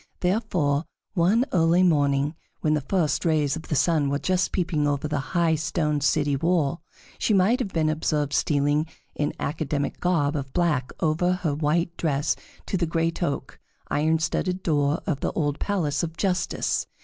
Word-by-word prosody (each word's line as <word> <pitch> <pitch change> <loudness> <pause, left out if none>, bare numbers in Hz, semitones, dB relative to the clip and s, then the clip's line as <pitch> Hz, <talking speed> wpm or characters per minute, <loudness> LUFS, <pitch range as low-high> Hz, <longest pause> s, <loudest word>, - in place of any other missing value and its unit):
Therefore, 180 -7 +1 0.3
one 205 +7 +3
early 170 +1 +4
morning, 145 -3 +2 0.3
when 155 - +2
the 150 - +1
first 175 -4 0
rays 155 -4 +2
of 160 - -8
the 150 - -1
sun 145 0 +2
were 140 - +1
just 185 +4 0
peeping 165 -5 0
over 145 +1 -1
the 150 -1 -1 0.2
high 170 -2 +3
stone 150 -1 0
city 145 0 +2
wall, 165 0 +1 0.4
she 215 - +2
might 200 +7 +3
have 245 - -2
been 160 -2 +1
observed 150 -2 0
stealing 145 +1 +1 0.3
in 145 - -1
academic 145 -1 -2
garb 160 -5 +1
of 135 -2 -4
black 150 -8 +1
over 165 +3 +2
her 175 -5 -1
white 165 +3 0
dress 145 -2 0 0.3
to 190 - -1
the 170 -2 0
great 165 +1 -1
oak, 145 -5 -3 0.3
iron 160 +2 +2
studded 180 +3 -1
door 145 -1 +1
of 145 -4 -1
the - - -1
old 145 -3 -1
Palace 160 -9 0
of 165 -1 -4
Justice. 185 -2 0
155 Hz, 170 wpm, -25 LUFS, 145-175 Hz, 0.4 s, early